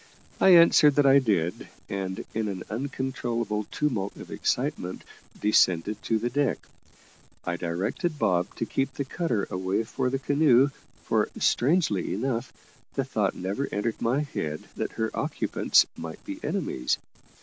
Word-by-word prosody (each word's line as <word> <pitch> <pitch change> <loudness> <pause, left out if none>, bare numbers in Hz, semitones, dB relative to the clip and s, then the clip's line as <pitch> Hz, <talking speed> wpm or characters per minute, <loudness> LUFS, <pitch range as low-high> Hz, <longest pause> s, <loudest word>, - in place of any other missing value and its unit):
I - - +6
answered 155 -4 +7
that 145 - +4
I 135 0 +7
did, 100 -9 0 0.2
and, 95 -1 -4
in 110 -1 -1
an 95 -3 -4
uncontrollable 120 -4 -2
tumult 110 -10 -2
of - - -11
excitement, 90 +1 -2 0.4
descended 105 -1 +2
to 115 - 0
the 120 +2 -2
deck. 140 -2 +1 0.9
I 85 - -1
directed 95 - -2
Bob 90 -6 +1
to - - -2
keep 135 +3 -2
the 140 - -2
cutter 130 - -1
away 95 +4 0
for 125 +3 -2
the 135 - 0
canoe, 140 -1 +4 0.3
for, - - +1
strangely 135 - +2
enough, 120 +2 -2 0.4
the - - +1
thought - - 0
never 100 +9 -2
entered 110 +2 -2
my 125 +5 +1
head 80 - -4
that - - -3
her 110 -1 -2
occupants - - +2
might 80 0 -8
be - - -6
enemies. 60 - -1
115 Hz, 145 wpm, -27 LUFS, 95-135 Hz, 0.9 s, answered